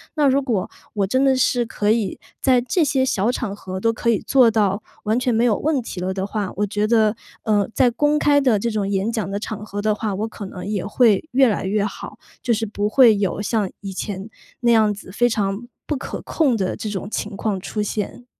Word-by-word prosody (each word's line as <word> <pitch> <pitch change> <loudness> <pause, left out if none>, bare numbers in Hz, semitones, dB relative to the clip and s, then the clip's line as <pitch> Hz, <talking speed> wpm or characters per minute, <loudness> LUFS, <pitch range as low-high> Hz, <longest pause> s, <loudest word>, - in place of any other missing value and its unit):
那 295 -3 +3
如 275 +1 +3
果， 230 -9 -1 0.2
我 200 -2 0
真 260 +6 +2
的 270 -1 +4
是 245 -1 +2
可 210 -2 -1
以， 220 -5 0 0.2
在 255 -2 +4
这 320 +7 +1
些 270 -2 +1
小 210 +5 +1
场 215 -6 -3
合 190 -2 -6
都 230 +4 +2
可 235 +1 -1
以 225 - +4
做 255 -4 +4
到， 210 -2 +1 0.2
完 220 +4 +1
全 250 -2 0
没 225 - +2
有 220 - +3
问 305 -2 0
题 185 - -6
了 185 +1 -2
的 190 0 -2
话， 205 -2 -3
我 210 - +1
觉 205 +1 -1
得， 220 -1 +3 0.3
呃， 210 -3 +2
在 250 - +4
公 295 +4 +2
开 290 -1 +4
的 250 -6 +3
这 235 - -1
种 205 -2 -1
演 200 +3 0
讲 215 -5 -2
的 200 +1 -3
场 215 0 -6
合 205 -1 -6
的 215 0 +2
话， 210 -1 -2
我 215 +3 -2
可 210 -2 -8
能 180 -1 -8
也 205 -2 -2
会 215 -2 +3
越 260 0 +5
来 210 - -1
越 200 +1 +1
好。 205 0 -7 0.2
就 245 - -1
是 225 0 -1
不 205 0 -2
会 235 -1 +6
有 200 -1 -1
像 210 -2 0
以 195 -1 -6
前， 195 +1 -5 0.3
那 235 -1 +3
样 220 -2 +4
子， 195 -2 -11
非 240 +4 +2
常 210 +1 -2 0.2
不 300 - -1
可 - - -6
控 285 -7 +1
的 190 -2 -1
这 215 - -5
种 200 -1 -4
情 210 -2 -4
况 200 -3 -1
出 210 +1 -3
现。 210 +4 -4
215 Hz, 255 characters per minute, -21 LUFS, 200-240 Hz, 0.3 s, 会